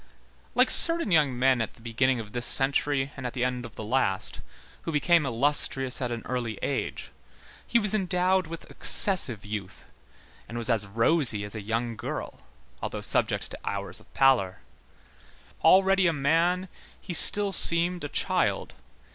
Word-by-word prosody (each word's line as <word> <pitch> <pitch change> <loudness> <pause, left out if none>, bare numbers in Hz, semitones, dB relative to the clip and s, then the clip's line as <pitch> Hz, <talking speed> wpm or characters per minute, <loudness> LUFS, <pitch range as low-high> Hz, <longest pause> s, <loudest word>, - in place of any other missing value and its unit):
Like - - +3
certain 335 - +6
young 145 -6 +2
men 130 -1 +2
at 110 - -5
the - - -22
beginning 120 +2 -1
of 105 -2 -9
this 120 +1 -1
century 135 0 +1
and 135 - -9
the 125 0 -4
end 125 -1 -3
of 110 - -19
the - - -8
last, 105 -4 -2 0.4
who 165 - -5
became 160 0 +1
illustrious 135 +1 -1
at 125 - -2
an 115 -1 -6
early 120 -4 -4
age, - - -4 0.6
he 235 - +2
was 210 -3 +1
endowed 185 -2 0
with 165 0 -10
excessive 135 - +2
youth, 105 -3 -8 0.6
and 115 - -7
was 120 +1 -1
as 105 -3 0
rosy 115 +1 +3
as 105 - -7
a 110 - -6
young 115 +3 -4
girl, - - -7 0.4
although - - -5
subject - - -2
to - - -9
hours 100 -2 -5
of - - -20
pallor. 120 -9 +1 1.0
Already 190 0 +4
a 165 - 0
man, 165 +6 0 0.3
he 180 - -8
still 205 +4 +4
seemed 175 0 +3
a 145 - -5
child. - - -2
135 Hz, 160 wpm, -26 LUFS, 115-170 Hz, 1.0 s, certain